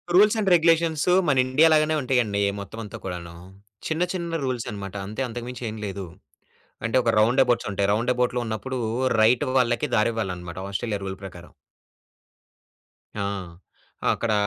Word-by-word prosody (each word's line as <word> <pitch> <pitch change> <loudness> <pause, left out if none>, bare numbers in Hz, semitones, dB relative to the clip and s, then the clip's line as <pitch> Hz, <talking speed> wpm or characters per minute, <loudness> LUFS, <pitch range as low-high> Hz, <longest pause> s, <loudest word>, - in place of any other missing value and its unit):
Rules 210 +4 +6
and 200 -3 +1
regulations 165 -2 +3 0.2
మన 140 -2 +3
India 145 +5 +5
లాగానే 155 0 +3
ఉంటాయండి. 125 -6 +1 0.2
మొత్తం 100 +3 -8
అంతా 105 - -8
కూడాను. 85 -2 -6 0.5
చిన్న, 160 +2 0
చిన్న 170 -2 -3
రూల్స్ 125 -3 -2
అన్నమాట 100 -1 -7
అంతే, 110 +5 -5
అంతకు 120 0 -6
మించి 125 0 -7
ఏమి 110 0 -7
లేదు. 100 -1 -5 0.8
అంటే 115 - -1
ఒక 115 -1 +2
రౌండ్‌ఎబౌట్స్ 120 +1 +3
ఉంటాయి. 100 +1 +1
రౌండ్‌ఎబౌట్‌లో 125 +2 +1
ఉన్నప్పుడు 125 +4 -4 0.4
రైట్ 120 +5 +4
వాళ్ళకి 120 +3 +1
దారి 110 +1 +3
ఇవ్వాలి 110 -4 -2
అన్నమాట. 90 0 -8
ఆస్ట్రేలియా 100 +1 -2
రూల్ 95 -1 -5
ప్రకారం. 90 -2 -10 1.7
ఆ! - - -2 0.9
అక్కడ 115 - -2
120 Hz, 145 wpm, -24 LUFS, 100-135 Hz, 1.7 s, రూల్స్